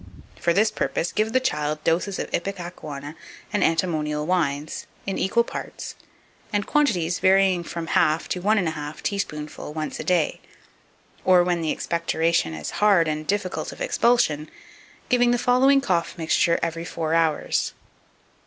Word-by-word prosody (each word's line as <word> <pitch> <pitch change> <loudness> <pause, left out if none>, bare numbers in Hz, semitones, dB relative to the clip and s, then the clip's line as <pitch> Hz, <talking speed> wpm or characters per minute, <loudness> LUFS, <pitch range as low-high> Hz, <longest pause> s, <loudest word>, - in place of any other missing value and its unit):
For 170 - +2
this 210 +5 +3
purpose, 175 -5 -1
give 215 +1 0
the 260 - +3
child 150 -9 -1
doses 180 +4 +1
of - - -4
ipecacuanha 170 -6 -5 0.4
and 205 - +2
antimonial 155 -3 0
wines, 155 -4 -1 0.2
in 195 - -2
equal 235 +5 +2
parts, - - -7 0.6
and 205 -1 0
quantities 185 - +1
varying 190 -1 +4
from 170 0 -5
half 160 0 +2
to 180 - -2
one 215 +4 +3
and 180 -5 +1
a - - 0
half 150 -1 -7
teaspoonful 150 -7 -4
once 155 -1 -4
a - - -3
day, 175 -4 +1 0.8
or, 180 -1 +6
when 175 -1 0
the 160 - -1
expectoration 165 - 0
is 75 -1 -5
hard 195 -6 +5
and 155 0 -3
difficult 195 -2 -2
of - - -12
expulsion, 235 - +2 0.6
giving 245 -1 +3
the 245 - +3
following 260 +3 +4
cough 180 -7 -1
mixture 170 +1 +2
every 165 0 -2
four 165 -2 -3
hours. 165 -2 +1
170 Hz, 155 wpm, -24 LUFS, 155-200 Hz, 0.8 s, or